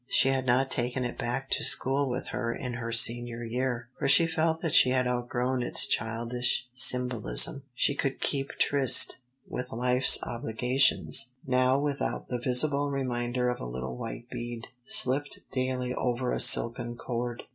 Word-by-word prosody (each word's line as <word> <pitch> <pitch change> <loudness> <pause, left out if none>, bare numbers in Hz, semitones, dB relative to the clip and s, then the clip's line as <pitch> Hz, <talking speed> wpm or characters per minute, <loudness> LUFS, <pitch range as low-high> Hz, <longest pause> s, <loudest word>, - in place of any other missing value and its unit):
She 135 - +2
had 130 -1 -1
not 130 +2 +1
taken 125 +1 -2
it 120 - -5
back 130 +3 -4
to - - 0
school 135 +1 0
with 125 +1 -5
her 115 -1 -3
in 125 +1 -6
her 115 -1 -5
Senior 120 +1 0
year, 120 0 -3
for - - -1
she 155 +4 +5
felt 160 0 -1
that 165 -3 -3
she 130 - +5
had 130 0 +1
outgrown 125 +1 -2
its - - +2
childish 120 +3 -2
symbolism. 125 +2 +2
She 145 - +1
could 135 -1 -3
"keep 140 -1 -3
tryst" 140 -3 +3 0.3
with 125 0 -6
life's 125 +3 +4
obligations 125 +3 +1
now 130 0 +2
without 140 -1 -3
the 125 - -3
visible 140 +4 +2
reminder 125 -2 -2
of 125 - -4
a - - -6
little 65 +1 -6
white 120 - -8
bead, 120 -1 -7
slipped 140 +4 +2
daily 130 -1 -2
over 125 0 -2
a - - -2
silken 120 +1 +5
cord. 120 0 -5
125 Hz, 160 wpm, -27 LUFS, 120-135 Hz, 0.3 s, she